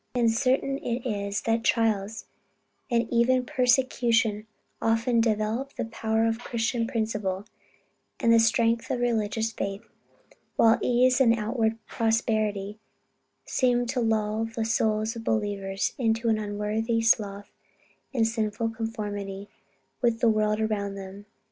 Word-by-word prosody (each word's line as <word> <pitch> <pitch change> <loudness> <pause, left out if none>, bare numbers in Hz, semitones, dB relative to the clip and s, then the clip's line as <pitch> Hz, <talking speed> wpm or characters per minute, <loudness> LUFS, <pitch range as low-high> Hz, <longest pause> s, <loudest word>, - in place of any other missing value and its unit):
And 235 -2 +3
certain 270 +3 +1
it 240 -1 -3
is, 200 -2 -2
that 230 0 0
trials, 220 -2 0 0.6
and 235 -1 +1
even 250 +2 +3
persecution 240 -4 +2 0.3
often 230 +1 +2
develop 225 +4 -1
the - - -2
power 225 0 0
of 225 0 0
Christian 235 -1 -1
principle, 210 -5 -2 0.7
and 230 - +4
the 230 - +6
strength 230 0 +2
of 250 - -1
religious 225 -2 0
faith; 195 -2 -4 0.7
while 225 0 +5
ease 250 +1 +3
and 230 -3 +5
outward 220 0 0
prosperity 215 -2 -1 0.7
seem 245 -2 +1
to 250 +2 -2
lull 220 -1 0
the 225 0 -3
souls 220 0 0
of 230 - -7
believers 200 -3 -1
into 230 -1 +1
an 220 -1 +2
unworthy 215 +2 -1
sloth 205 -3 +1 0.6
and 245 -5 +1
a - - +4
sinful 225 0 -1
conformity 205 -3 -5 0.5
with 235 -2 +2
the 235 - +4
world 215 -1 +1
around 205 -2 -1
them. 195 +1 -9
225 Hz, 130 wpm, -26 LUFS, 210-235 Hz, 0.7 s, the